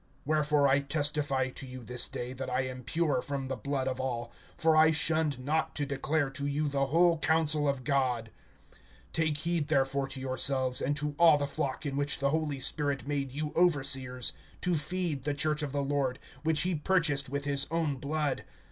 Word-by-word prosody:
(26)Wherefore 150 -2 +3
I 135 +1 +4
testify 145 -2 0
to 135 - -8
you 130 -1 -9
this 125 +2 +1
day, 125 +1 -5
that 130 0 -5
I 125 +1 +1
am 130 0 -5
pure 150 -2 0
from 135 -1 -4
the 130 - -1
blood 135 +2 -2
of 130 -1 -2
all; 120 -3 -3 0.3
(27)for 160 -1 +3
I 155 0 +7
shunned 155 -2 +1
not 150 +5 -1
to 145 - 0
declare 140 +1 -1
to 140 +1 -3
you 145 +2 0
the 140 -1 0
whole 170 +3 +3
counsel 155 -2 +2
of 140 -2 -2
God. 125 -5 0 0.8
(28)Take 155 -2 +1
heed 165 -1 -1
therefore 135 -2 +1
to 135 - -8
yourselves, 130 0 +1
and 145 +2 0
to 150 0 -2
all 165 -3 +7
the 145 - -1
flock, 140 +1 -3
in 140 -1 -2
which 145 0 +1
the 140 0 +1
Holy 155 -3 -1
Spirit 140 0 0
made 140 -2 -2
you 150 +2 -4
overseers, 135 -7 +1 0.3
to 180 - 0
feed 165 -3 -2
the 145 0 -1
church 150 +1 +1
of 145 -2 -3
the 140 0 -1
Lord[20:28], 135 -2 0 0.2
which 155 -1 +2
he 185 0 0
purchased 150 -4 +1
with 140 +1 -3
his 140 -1 +1
own 160 -4 0
blood. 145 +2 -2
145 Hz, 195 wpm, -30 LUFS, 135-155 Hz, 0.8 s, I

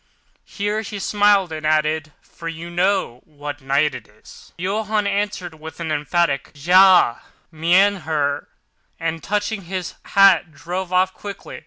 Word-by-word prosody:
Here 210 +1 -2
he 210 -1 -7
smiled, 205 -2 +2
and 155 -1 -6
added, 155 0 +1
"for 165 - -10
you 165 +1 -6
know 175 -8 0
what 145 -1 -8
night 140 +3 +1
it 115 - -9
is." 105 +1 -17
Johann 210 +3 -1
answered 200 -5 -2
with 160 +2 -10
an 165 -2 -3
emphatic, 150 -1 0
"Ja, 180 -3 +5 0.3
mein 180 +6 +3
Herr," 150 -4 -2 0.5
and, 165 0 -3
touching 205 0 -2
his 185 0 -4
hat, 190 -4 +4
drove 180 +4 -5
off 185 +1 +2
quickly. 200 -2 -9
175 Hz, 140 wpm, -21 LUFS, 155-195 Hz, 0.5 s, Ja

